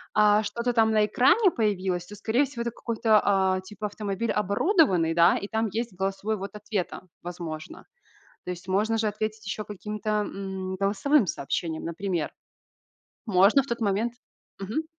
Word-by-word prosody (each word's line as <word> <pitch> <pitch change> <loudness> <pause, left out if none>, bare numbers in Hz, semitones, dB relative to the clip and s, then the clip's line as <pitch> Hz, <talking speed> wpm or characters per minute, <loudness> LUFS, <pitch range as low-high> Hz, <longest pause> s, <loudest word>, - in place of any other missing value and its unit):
а, 210 0 +5
что-то 235 +4 -2
там 225 -1 +4
на 215 -1 +4
экране 340 - +4
появилось, 190 - -1
то, 210 - -10
скорее 230 +7 +1
всего, 250 -3 -7
это 235 - -2
какой-то, 225 -2 +2
а, 190 -2 +2
типа 210 +2 -8
автомобиль 205 +1 -3
оборудованный, 200 - +2
да, 170 0 +5
и 200 - -5
там 220 0 0
есть 225 +1 -3
голосовой 195 +3 -2
ввод 195 +2 -7
ответа, 210 -4 -4 0.2
возможно. 165 -3 -7 0.6
То - - -5
есть, 180 +1 -10
можно 215 +4 +1
же 220 - +1
ответить 215 0 -4
ещё 210 +2 -3
каким-то, 210 +1 -5 0.2
м, 190 -1 -5
голосовым 205 +6 +2
сообщением, 160 +3 -3
например. 170 -1 -2 1.0
Можно 205 +7 +5
в - - -13
тот 235 -2 -3
момент 220 +3 0 0.5
Мгм. 220 +12 -2
210 Hz, 155 wpm, -26 LUFS, 190-225 Hz, 1.0 s, а